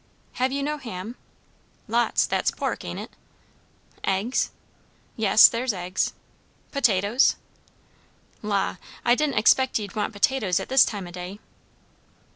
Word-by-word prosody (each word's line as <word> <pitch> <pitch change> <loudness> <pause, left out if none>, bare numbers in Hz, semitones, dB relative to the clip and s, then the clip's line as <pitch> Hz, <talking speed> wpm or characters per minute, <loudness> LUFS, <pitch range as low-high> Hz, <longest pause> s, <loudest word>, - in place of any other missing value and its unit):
Have 260 +1 +2
you 280 +1 -2
no 300 +1 -2
ham?" 225 -2 -7 0.7
"Lots. 235 +2 +2
That's - - 0
pork, - - -3
ain't - - -6
it?" - - -8 0.9
"Eggs?" 195 +6 0 0.7
"Yes, 215 -1 +7
there's 235 0 -1
eggs." 180 -1 -2 0.6
"Potatoes?" 230 -2 +2 1.1
"La, 200 -3 -1 0.3
I 240 - +5
didn't 285 0 0
expect 260 +4 +4
ye'd 205 -4 -6
want 210 0 -1
potatoes 205 -3 +1
at - - -7
this 265 0 +6
time 200 -4 -5
o' 175 - -9
day." 180 +2 -7
220 Hz, 125 wpm, -24 LUFS, 195-260 Hz, 1.1 s, Yes